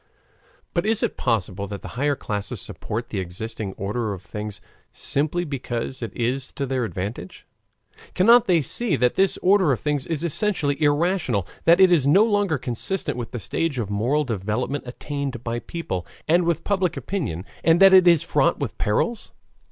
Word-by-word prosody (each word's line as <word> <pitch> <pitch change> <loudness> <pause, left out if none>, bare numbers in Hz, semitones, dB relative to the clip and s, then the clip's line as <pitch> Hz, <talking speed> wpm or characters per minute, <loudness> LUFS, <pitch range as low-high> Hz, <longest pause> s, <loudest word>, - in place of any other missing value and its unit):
But 170 - +1
is 225 -1 +1
it - - 0
possible 100 -4 -1
that 100 0 -7
the - - -7
higher 145 +4 0
classes 105 -5 -4
support 115 +3 -5
the 105 - -3
existing 95 +3 -5
order 105 +3 -3
of 95 -1 -9
things 105 0 -6 0.3
simply 155 +5 -1
because 130 -3 -4
it 115 - -4
is 125 +3 -1
to 140 - -3
their 130 -2 -1
advantage? 100 -2 -6 0.7
Cannot 230 +5 +6
they 170 -5 +3
see 215 - 0
that 125 -2 +2
this 195 -1 +2
order 185 -4 +4
of 125 - 0
things 145 -2 -1
is 165 -1 -2
essentially 160 -4 0
irrational, 145 - +1 0.2
that 170 +1 +6
it 190 -1 +7
is 150 -6 +3
no 185 +9 +6
longer 205 -7 +1
consistent 125 +9 -2
with 120 -2 -5
the 125 - -6
stage 145 - -2
of 105 -4 -3
moral 125 +9 +1
development 115 +4 -2
attained 135 -1 -5
by 120 0 -2
people, 110 - -5 0.2
and 170 +2 +3
with 170 -1 0
public 190 -3 0
opinion, 115 - -3 0.2
and 165 +1 +4
that 195 0 +8
it 185 -1 +7
is 170 -4 +5
fraught - - +2
with - - -4
perils? 220 - -1
140 Hz, 175 wpm, -23 LUFS, 110-170 Hz, 0.7 s, that